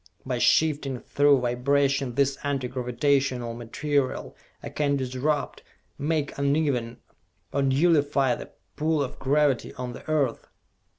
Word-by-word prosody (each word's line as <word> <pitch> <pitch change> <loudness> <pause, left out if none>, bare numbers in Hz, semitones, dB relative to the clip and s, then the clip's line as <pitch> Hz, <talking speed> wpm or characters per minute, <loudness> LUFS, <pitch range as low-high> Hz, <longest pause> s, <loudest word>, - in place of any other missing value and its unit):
By 125 -2 -2
shifting 145 -2 +2
through 145 0 +3
vibration 135 +1 +1
this 140 0 +2
Anti 135 -3 -1
Gravitational 125 -1 0
material, 130 +4 -2 0.3
I - - -5
can 145 -1 0
disrupt, 135 +3 -2 0.4
make 150 0 -1
uneven, 140 -5 0 0.6
or 140 - +1
nullify 140 -1 +3
the - - -7 0.3
pull 155 -1 +1
of 130 - -7
gravity 140 -2 +1
on 125 -1 -5
the - - -9
Earth!" 140 -7 0
140 Hz, 120 wpm, -26 LUFS, 125-145 Hz, 0.6 s, through